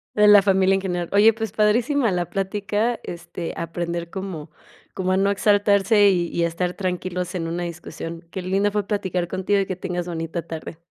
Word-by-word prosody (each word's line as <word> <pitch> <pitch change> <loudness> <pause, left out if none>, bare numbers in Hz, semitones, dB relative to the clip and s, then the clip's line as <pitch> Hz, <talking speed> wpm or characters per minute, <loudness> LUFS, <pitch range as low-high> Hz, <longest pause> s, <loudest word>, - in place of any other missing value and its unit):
De 210 0 +5
la 205 -1 +9
familia 190 -1 +3
en 195 - -1
general. 175 -2 -3
Oye, 205 +3 +6
pues, 220 -2 -4
padrísima 225 +3 +2
la 175 -1 -1
plática, 205 +4 -1
este, 170 0 -6
aprender 170 0 -4
como 185 -5 -6 0.4
como 185 -1 -1
a 185 - +2
no 195 +1 +2
exaltarse, 205 0 +4
y 175 -3 +1
y 170 - +1
a 170 - +3
estar 175 +2 -2
tranquilos 180 -1 -3
en 165 -2 -2
una 170 +1 -3
discusión. 165 0 -7
Qué 190 - -4
lindo 195 +3 +1
fue 205 -1 -2
platicar 185 -4 -1
contigo 190 +3 0
y 195 - +1
que 185 - -3
tengas 175 -1 -4
bonita 165 0 -3
tarde. 160 0 -8
185 Hz, 190 wpm, -23 LUFS, 175-205 Hz, 0.4 s, la